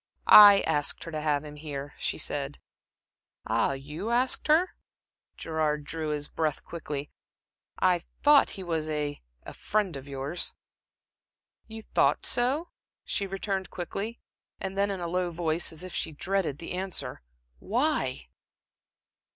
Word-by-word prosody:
"I 205 Hz, -1 st, +10 dB
asked 145 Hz, -1 st, 0 dB
her 165 Hz, -, -7 dB
to 155 Hz, -1 st, -3 dB
have 150 Hz, -1 st, +1 dB
him 150 Hz, 0 st, -9 dB
here," 145 Hz, -2 st, -6 dB
she -, -, -1 dB
said. -, -, -3 dB, 0.9 s
"Ah, -, -, +1 dB
you 150 Hz, +10 st, -5 dB
asked 250 Hz, +5 st, +1 dB
her?" 320 Hz, +5 st, +4 dB, 0.7 s
Gerard 155 Hz, -2 st, -1 dB
drew 155 Hz, +1 st, -4 dB
his 150 Hz, -1 st, -1 dB
breath 155 Hz, -3 st, -2 dB
quickly. 150 Hz, -4 st, -6 dB, 0.7 s
"I 180 Hz, -1 st, +3 dB, 0.2 s
thought 295 Hz, -1 st, +7 dB
he 190 Hz, -, -5 dB
was 160 Hz, -3 st, -2 dB
a 150 Hz, -1 st, -2 dB, 0.2 s
a -, -, -9 dB
friend 205 Hz, -6 st, -1 dB
of 135 Hz, 0 st, -8 dB
yours." 140 Hz, +5 st, -3 dB, 1.1 s
"You 220 Hz, 0 st, -8 dB
thought -, -, +2 dB
so?" 270 Hz, +8 st, 0 dB, 0.4 s
she 200 Hz, -, -1 dB
returned 195 Hz, 0 st, -3 dB
quickly, 200 Hz, +6 st, -5 dB, 0.4 s
and 190 Hz, 0 st, -4 dB
then 200 Hz, +1 st, +2 dB
in 195 Hz, -2 st, -3 dB
a 170 Hz, -, -2 dB
low 180 Hz, +1 st, 0 dB
voice, 165 Hz, -1 st, -1 dB
as 160 Hz, +2 st, -7 dB
if 185 Hz, -, -7 dB
she -, -, -1 dB
dreaded 175 Hz, -1 st, -1 dB
the 165 Hz, -, -7 dB
answer: 180 Hz, -8 st, -3 dB, 0.4 s
"Why?" 235 Hz, -, 0 dB
170 Hz, 145 wpm, -28 LUFS, 150-200 Hz, 1.1 s, I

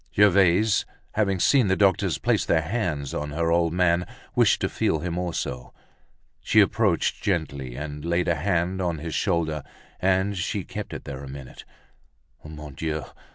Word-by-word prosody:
Gervaise 100 Hz, +1 st, +4 dB, 0.3 s
having 100 Hz, -3 st, 0 dB
seen 130 Hz, +2 st, +4 dB
the 95 Hz, -, +3 dB
doctors 95 Hz, -3 st, +2 dB
place -, -, +1 dB
their 80 Hz, -1 st, +2 dB
hands 85 Hz, -, -2 dB
on 75 Hz, -, -3 dB
her 80 Hz, +3 st, 0 dB
old 85 Hz, -1 st, +2 dB
man, 90 Hz, 0 st, +2 dB, 0.3 s
wished -, -, +4 dB
to -, -, +1 dB
feel -, -, 0 dB
him 85 Hz, +2 st, -3 dB
also. 80 Hz, -8 st, -4 dB, 0.6 s
She -, -, +3 dB
approached -, -, +2 dB
gently 70 Hz, -9 st, -2 dB
and 75 Hz, +1 st, -6 dB
laid 85 Hz, +1 st, 0 dB
a 85 Hz, -, +3 dB
hand 90 Hz, +2 st, 0 dB
on 85 Hz, -3 st, -1 dB
his 80 Hz, +1 st, -5 dB
shoulder, 80 Hz, -5 st, 0 dB, 0.4 s
and 95 Hz, +2 st, +1 dB
she 90 Hz, -, -2 dB
kept -, -, -6 dB
it -, -, -7 dB
there 70 Hz, -1 st, -7 dB
a 70 Hz, -, -8 dB
minute. 65 Hz, -2 st, -10 dB, 0.8 s
_Mon 75 Hz, -2 st, -9 dB
Dieu! 80 Hz, +1 st, -3 dB
85 Hz, 160 wpm, -25 LUFS, 75-95 Hz, 0.8 s, Gervaise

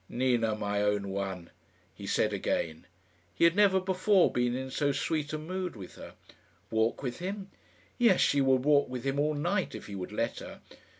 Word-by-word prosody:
"Nina, 120 Hz, -3 st, +1 dB
my 105 Hz, -1 st, -1 dB
own 105 Hz, -1 st, 0 dB
one," 95 Hz, -3 st, -4 dB, 0.4 s
he -, -, -9 dB
said -, -, +1 dB
again. 80 Hz, +1 st, -2 dB, 0.5 s
He -, -, 0 dB
had 170 Hz, +1 st, +5 dB
never 200 Hz, -2 st, +5 dB
before 190 Hz, +1 st, +3 dB
been 120 Hz, 0 st, 0 dB
in 130 Hz, 0 st, -5 dB
so 145 Hz, +1 st, +1 dB
sweet 150 Hz, +1 st, -2 dB
a 155 Hz, -, -2 dB
mood 180 Hz, +2 st, -4 dB
with 95 Hz, -4 st, -10 dB
her. -, -, -11 dB, 0.6 s
Walk 110 Hz, +4 st, 0 dB
with 125 Hz, -2 st, -4 dB
him? 195 Hz, +2 st, -5 dB, 0.5 s
Yes; 230 Hz, -6 st, +5 dB
she 140 Hz, -, +3 dB
would 130 Hz, -1 st, +2 dB
walk 145 Hz, -2 st, +4 dB
with 125 Hz, -1 st, -5 dB
him 135 Hz, +1 st, -1 dB
all 150 Hz, +1 st, +1 dB
night 175 Hz, +6 st, -1 dB
if -, -, -8 dB
he 100 Hz, -, -9 dB
would 95 Hz, -2 st, -5 dB
let -, -, -2 dB
her. -, -, -9 dB
135 Hz, 190 wpm, -30 LUFS, 110-175 Hz, 0.6 s, had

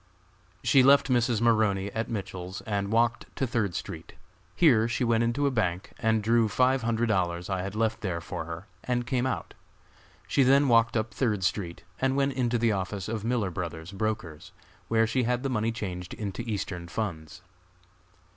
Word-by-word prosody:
She 135 Hz, -, +5 dB
left 140 Hz, +1 st, +5 dB
Mrs. 120 Hz, -2 st, +2 dB
Maroney 105 Hz, -4 st, +2 dB
at 110 Hz, +2 st, -3 dB
Mitchell's 95 Hz, -4 st, -5 dB
and 100 Hz, -2 st, -2 dB
walked 115 Hz, +1 st, +2 dB
to 135 Hz, -, 0 dB
Third 110 Hz, -7 st, -1 dB
street. -, -, -6 dB, 0.4 s
Here 120 Hz, -9 st, +5 dB
she 120 Hz, +1 st, -1 dB
went 115 Hz, -1 st, +2 dB
into 120 Hz, +5 st, 0 dB
a 140 Hz, -, +2 dB
bank 95 Hz, -7 st, -1 dB
and 110 Hz, -2 st, +1 dB
drew 115 Hz, +1 st, +3 dB
five 130 Hz, +3 st, +2 dB
hundred 115 Hz, 0 st, 0 dB
dollars 90 Hz, -4 st, -1 dB
I 95 Hz, -1 st, 0 dB
had 100 Hz, +2 st, -5 dB
left 110 Hz, 0 st, 0 dB
there 90 Hz, -5 st, -2 dB
for 80 Hz, -1 st, -5 dB
her 85 Hz, +3 st, -7 dB, 0.2 s
and 120 Hz, -1 st, -1 dB
came 130 Hz, 0 st, 0 dB
out. 130 Hz, -, -4 dB, 0.7 s
She -, -, +2 dB
then 135 Hz, +2 st, +5 dB
walked 115 Hz, -1 st, +4 dB
up 110 Hz, +1 st, -2 dB
Third 105 Hz, -7 st, 0 dB
street 85 Hz, -1 st, -2 dB, 0.2 s
and 130 Hz, 0 st, +1 dB
went 140 Hz, 0 st, +1 dB
into 125 Hz, -2 st, 0 dB
the 115 Hz, -1 st, +2 dB
office 95 Hz, -1 st, -3 dB
of 110 Hz, -2 st, -3 dB
Miller 115 Hz, -5 st, 0 dB
Bros., 85 Hz, 0 st, -5 dB
brokers, 100 Hz, -6 st, -4 dB, 0.4 s
where 115 Hz, 0 st, +3 dB
she 130 Hz, +3 st, 0 dB
had 125 Hz, +1 st, 0 dB
the 135 Hz, -, -1 dB
money 115 Hz, -1 st, 0 dB
changed 90 Hz, -6 st, -5 dB
into 100 Hz, -1 st, -4 dB
Eastern 100 Hz, -6 st, -4 dB
funds. 90 Hz, -3 st, -5 dB
110 Hz, 180 wpm, -28 LUFS, 95-120 Hz, 0.7 s, She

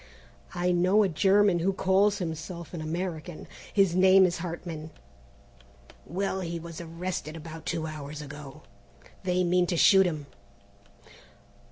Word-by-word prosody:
"I 180 Hz, +1 st, +1 dB
know 185 Hz, +4 st, +4 dB
a -, -, +3 dB
German 190 Hz, +3 st, +3 dB
who 185 Hz, +4 st, +1 dB
calls 195 Hz, +2 st, +2 dB
himself 170 Hz, -1 st, -6 dB
an 170 Hz, -, -5 dB
American; 165 Hz, 0 st, -5 dB, 0.2 s
his 195 Hz, -4 st, +3 dB
name 190 Hz, +1 st, +6 dB
is 175 Hz, -2 st, -1 dB
Hartman." 165 Hz, -2 st, -6 dB, 1.2 s
"Well, 190 Hz, +4 st, -2 dB
he 170 Hz, -1 st, -4 dB
was 170 Hz, 0 st, -8 dB
arrested 165 Hz, -1 st, -5 dB
about 160 Hz, 0 st, -9 dB
two 165 Hz, -2 st, -2 dB
hours 150 Hz, -1 st, -7 dB
ago. 150 Hz, 0 st, -10 dB, 0.6 s
They 180 Hz, 0 st, +1 dB
mean 180 Hz, 0 st, +2 dB
to 175 Hz, -, -1 dB
shoot 190 Hz, +2 st, +6 dB
him." 155 Hz, -4 st, -4 dB
175 Hz, 135 wpm, -28 LUFS, 160-185 Hz, 1.2 s, name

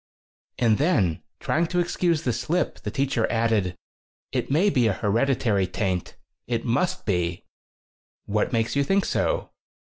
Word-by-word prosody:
And 115 Hz, -3 st, +3 dB
then, 115 Hz, -, +2 dB, 0.2 s
trying 165 Hz, +2 st, +1 dB
to 180 Hz, +1 st, 0 dB
excuse 170 Hz, -2 st, +1 dB
the 125 Hz, -, +1 dB
slip, 160 Hz, +10 st, -1 dB
the -, -, -4 dB
teacher 135 Hz, -4 st, 0 dB
added: 110 Hz, -6 st, +1 dB, 0.6 s
"It -, -, -2 dB
may 175 Hz, +9 st, +3 dB
be 125 Hz, -7 st, +3 dB
a 105 Hz, -, +2 dB
hereditary 110 Hz, -2 st, +1 dB
taint. 95 Hz, -2 st, -2 dB, 0.3 s
It 115 Hz, -1 st, -2 dB
must 125 Hz, +10 st, 0 dB
be." 90 Hz, -4 st, -1 dB, 0.8 s
"What 105 Hz, +1 st, 0 dB
makes 115 Hz, 0 st, 0 dB
you 140 Hz, -, +3 dB
think 195 Hz, +7 st, +2 dB
so?" -, -, -1 dB
120 Hz, 145 wpm, -25 LUFS, 105-155 Hz, 0.8 s, And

